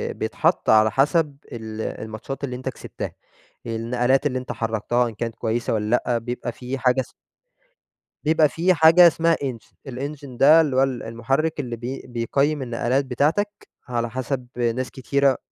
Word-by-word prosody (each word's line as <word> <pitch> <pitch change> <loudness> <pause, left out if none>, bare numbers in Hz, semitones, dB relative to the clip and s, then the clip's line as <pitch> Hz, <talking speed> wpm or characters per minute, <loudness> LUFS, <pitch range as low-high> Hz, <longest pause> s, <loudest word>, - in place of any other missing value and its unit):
بيتحط - - 0
على 110 0 +5
حسب 145 - +2
ال 110 -1 -6
الماتشات 110 +7 -6
اللي 125 -3 -3
أنت 130 +1 -4
كسبتها، 130 - -7 0.5
النقلات 120 +4 0
اللي 130 -3 0
أنت 130 - -6
حركتها 115 +2 0
إن - - -9
كانت 115 +1 -4
كويسة 115 +1 -1
والّا 105 -1 -1 0.2
لأ 120 - +1
بيبقى 120 +1 -4
في 125 +3 -5
حاجة 125 0 +2
اسمها - - -11 1.1
بيبقى 155 0 +4
في 175 +5 +2
حاجة 165 +2 +7
اسمها 165 +1 +2
Engine 125 -5 -6 0.2
الEngine 140 0 -6
ده 155 +4 +8
اللي 145 -5 -1
هو 130 - +5
ال 130 -3 -2
المحرك 135 +8 -1
اللي 125 -4 -3
بي 120 +4 -6
بيقيم 140 +5 0
النقلات 125 +2 0
بتاعتك 150 +11 +1 0.4
على 120 -1 -2
حسب 130 +1 -3
ناس 125 +1 -1
كتيرة 140 0 +1
130 Hz, 160 wpm, -23 LUFS, 115-140 Hz, 1.1 s, ده